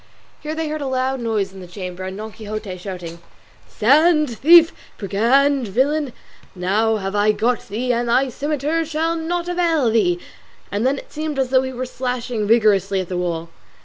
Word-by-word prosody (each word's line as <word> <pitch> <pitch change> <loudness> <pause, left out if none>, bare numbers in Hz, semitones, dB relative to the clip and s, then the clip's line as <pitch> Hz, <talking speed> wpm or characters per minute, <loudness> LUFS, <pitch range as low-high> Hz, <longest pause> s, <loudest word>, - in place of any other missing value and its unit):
Here 310 +1 -5
they 320 0 -2
heard 305 0 -4
a 280 - -2
loud 260 0 -1
noise 215 -5 -1
in 195 - -11
the 180 - -10
chamber, 180 0 -7
and 190 +1 -5
Don 215 +1 -6
Quixote 215 -3 -6
shouting 180 -2 -7
out, 170 - -15 0.5
"Stand, 300 +2 +3
thief, 330 +3 +7 0.2
brigand, 245 +6 +2
villain; 275 +6 0 0.4
now 205 +5 +1
I 215 - -3
have 205 +2 +1
got 235 +2 0
thee, 245 +4 -1
and 240 0 -1
thy 260 +3 +3
scimitar 295 +4 -1
shall 325 +1 -1
not 340 +1 -2
avail 335 -8 +1
thee!" 180 -6 +2 0.5
And 205 +5 0
then 275 +1 +1
it - - -11
seemed 310 -1 -3
as 260 -1 0
though 260 -1 +5
he 260 0 -4
were 255 0 -4
slashing 245 -3 -3
vigorously 205 -4 +3
at 185 - -4
the 180 - -2
wall. 170 -2 -3
240 Hz, 185 wpm, -20 LUFS, 205-285 Hz, 0.5 s, thief